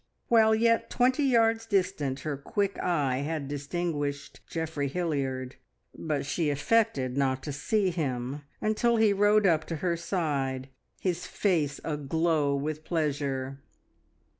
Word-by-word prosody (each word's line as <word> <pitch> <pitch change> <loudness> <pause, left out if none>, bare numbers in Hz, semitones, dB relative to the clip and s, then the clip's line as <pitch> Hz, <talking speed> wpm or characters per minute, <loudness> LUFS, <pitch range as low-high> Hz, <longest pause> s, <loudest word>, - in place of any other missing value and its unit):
While 220 -2 +5
yet 230 +1 +2
twenty 255 +3 +2
yards 225 -3 +3
distant 180 -10 0
her 150 0 -2
quick 200 +8 -2
eye 145 -7 +1
had 145 +1 -3
distinguished 145 0 -3
Geoffrey 160 -3 -2
Hilliard, 135 -6 -2 0.4
but 150 -3 -2
she 150 +2 0
affected 145 - +1
not 130 -1 0
to 150 - -4
see 190 +7 +1
him 135 -4 -3 0.2
until 235 +2 +2
he 220 -2 +4
rode 205 +1 +4
up 160 -4 +3
to 165 - -4
her 170 +2 0
side, 145 -7 -2 0.3
his 180 -3 -2
face 155 -8 0
aglow 150 0 0
with 150 +2 -3
pleasure. 140 -5 -2
155 Hz, 130 wpm, -28 LUFS, 140-195 Hz, 0.4 s, While